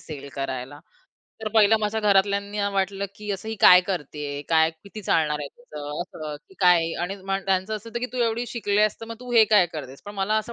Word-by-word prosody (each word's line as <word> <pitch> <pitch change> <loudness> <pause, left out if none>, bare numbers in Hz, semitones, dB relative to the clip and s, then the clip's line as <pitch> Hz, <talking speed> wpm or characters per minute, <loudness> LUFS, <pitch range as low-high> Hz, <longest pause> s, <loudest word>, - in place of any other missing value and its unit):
Sale 140 -3 -9
करायला. 135 +1 -5 0.6
तर 215 - -1
पहिलं 220 0 +5
माझ्या 210 +1 -1
घरातल्यांना 200 0 +2
वाटलं 195 0 -1
की 210 -1 -6
"असं 200 +3 -6
ही 220 - -2
काय 180 0 +9
करती 150 -5 -4
आहे? 145 0 -4
काय 160 -1 +4
किती 200 +6 -12
चालणार 155 -4 +1
आहे 145 - -5
त्याचं? 150 - -7
असं. 155 -4 -7
की - - -18
काय?" 170 -2 +4
आणि 195 +3 -3
म्हण 195 0 -2
त्यांचं 190 +3 0
असं 220 +2 -10
होतं 235 +1 -4
की 250 - -1
"तू 255 - -4
एवढी 230 +2 -1
शिकली 210 -4 -1
आहेस 215 0 +3
तर 225 - -7
मग 230 - -6
तू 250 0 -9
हे 225 -2 +7
काय 190 -4 +6
करतेस?" 140 -3 -8
पण 205 - -7
मला 200 +2 0
असं 220 +2 -5
195 Hz, 230 wpm, -24 LUFS, 160-215 Hz, 0.6 s, काय